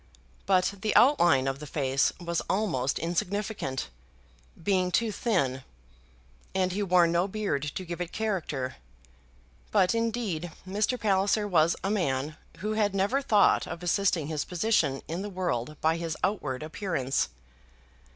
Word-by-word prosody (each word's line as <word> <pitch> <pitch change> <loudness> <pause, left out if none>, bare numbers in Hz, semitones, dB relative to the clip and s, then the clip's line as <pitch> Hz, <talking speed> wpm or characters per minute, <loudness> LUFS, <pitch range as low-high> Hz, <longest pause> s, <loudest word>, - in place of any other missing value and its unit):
But 190 0 +3
the 215 0 0
outline 175 - +5
of 135 0 -2
the 150 - -8
face 135 -2 +1
was 170 -1 -2
almost 165 -11 0
insignificant, 175 - -2 0.7
being 185 -2 +2
too 225 +4 +1
thin; 155 - 0 0.9
and 185 -1 +1
he 200 +3 -2
wore 180 -3 +4
no 170 +2 +1
beard 200 -8 -1
to 185 - -4
give 170 0 -5
it 175 - -4
character. 170 - -2 0.9
But, 180 - +3
indeed, 225 -8 -1 0.2
Mr. 210 +6 0
Palliser 205 0 +2
was 170 -3 +3
a 195 - 0
man 150 -7 -1 0.3
who 210 +2 -1
had 205 -2 +1
never 205 +9 +1
thought 215 -7 +4
of 170 - -7
assisting 180 -3 +1
his 155 -1 -2
position 180 -7 +1
in 170 +3 -3
the 205 - -4
world 155 -8 -2
by 160 +1 +2
his 165 -2 -3
outward 150 -9 -1
appearance. 155 -5 -1
180 Hz, 140 wpm, -28 LUFS, 155-205 Hz, 0.9 s, outline